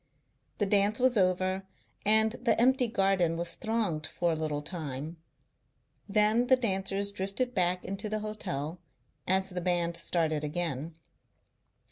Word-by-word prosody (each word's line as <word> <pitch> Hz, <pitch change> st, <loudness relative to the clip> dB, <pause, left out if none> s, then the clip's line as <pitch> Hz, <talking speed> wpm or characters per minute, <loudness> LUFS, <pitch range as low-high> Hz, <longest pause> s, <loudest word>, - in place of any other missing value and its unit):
The 205 Hz, -, +1 dB
dance 205 Hz, +2 st, +2 dB
was 255 Hz, 0 st, +3 dB
over 185 Hz, -1 st, +1 dB, 0.5 s
and 220 Hz, +1 st, +6 dB
the 235 Hz, -2 st, +2 dB
empty 255 Hz, +1 st, +4 dB
garden 195 Hz, -6 st, +1 dB
was 170 Hz, 0 st, 0 dB
thronged 215 Hz, -9 st, -1 dB
for 175 Hz, -1 st, -1 dB
a -, -, 0 dB
little 155 Hz, -2 st, -3 dB
time. 155 Hz, -1 st, -5 dB, 0.9 s
Then 215 Hz, +4 st, +3 dB
the 260 Hz, -, +6 dB
dancers 200 Hz, -3 st, -1 dB
drifted 200 Hz, +6 st, -2 dB
back 180 Hz, -2 st, +1 dB
into 195 Hz, +2 st, -4 dB
the 215 Hz, 0 st, -2 dB
hotel 175 Hz, -7 st, -4 dB, 0.5 s
as 190 Hz, +1 st, +2 dB
the 180 Hz, -1 st, -4 dB
band 175 Hz, -1 st, 0 dB
started 160 Hz, -3 st, -1 dB
again. 155 Hz, 0 st, -3 dB
190 Hz, 135 wpm, -29 LUFS, 170-215 Hz, 0.9 s, and